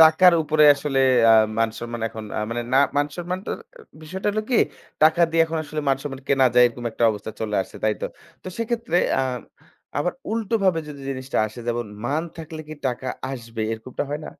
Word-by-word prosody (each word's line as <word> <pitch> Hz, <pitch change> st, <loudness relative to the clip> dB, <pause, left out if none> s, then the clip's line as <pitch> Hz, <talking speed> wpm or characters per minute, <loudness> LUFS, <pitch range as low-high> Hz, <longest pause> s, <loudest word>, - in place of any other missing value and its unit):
টাকার 160 Hz, +3 st, +8 dB
উপরে 155 Hz, 0 st, +3 dB
আসলে 140 Hz, -1 st, -2 dB, 0.3 s
আ -, -, +8 dB, 0.3 s
মান 115 Hz, 0 st, +2 dB
সম্মান 120 Hz, 0 st, -5 dB
এখন 110 Hz, -1 st, -8 dB
আ -, -, 0 dB
মানে 120 Hz, +1 st, -2 dB
না 135 Hz, -, +6 dB, 0.2 s
মান 145 Hz, 0 st, +3 dB
সম্মান 180 Hz, +1 st, -3 dB
ট -, -, -6 dB, 0.5 s
বিষয়টা 190 Hz, +6 st, -3 dB
হলো 215 Hz, +1 st, -1 dB
কি? 245 Hz, -, +3 dB, 0.5 s
টাকা 160 Hz, +2 st, +5 dB
দিয়ে 165 Hz, 0 st, +4 dB
এখন 160 Hz, 0 st, -3 dB
আসলে 150 Hz, +1 st, -4 dB
মান 135 Hz, -, +3 dB
সম্মান 135 Hz, -2 st, -6 dB
কেনা 135 Hz, -1 st, +4 dB
যায় 125 Hz, 0 st, +7 dB
এরকম 120 Hz, 0 st, -6 dB
একটা 115 Hz, -, 0 dB
অবস্থায় 105 Hz, 0 st, -6 dB
চলে 110 Hz, -1 st, -2 dB
আসছে, -, -, -13 dB
তাই 110 Hz, -, +3 dB
তো? -, -, +1 dB, 0.4 s
তো -, -, -6 dB
সেক্ষেত্রে 230 Hz, -3 st, -1 dB, 0.2 s
আ -, -, +3 dB, 0.8 s
আবার 180 Hz, +5 st, 0 dB, 0.2 s
উল্টোভাবে 205 Hz, -6 st, +1 dB
যদি 145 Hz, -2 st, -9 dB
জিনিসটা 130 Hz, 0 st, -3 dB
আসে? 110 Hz, +3 st, -11 dB
যেমন 120 Hz, -1 st, -1 dB, 0.2 s
মান 145 Hz, +6 st, 0 dB
থাকলে 160 Hz, -1 st, -7 dB
কি 155 Hz, -, -6 dB
টাকা 130 Hz, +1 st, -3 dB, 0.2 s
আসবে, 115 Hz, -3 st, -6 dB
এরকমটা 115 Hz, +3 st, -4 dB
হয় 145 Hz, -, -2 dB
না? -, -, -7 dB
145 Hz, 200 wpm, -23 LUFS, 120-165 Hz, 0.8 s, টাকার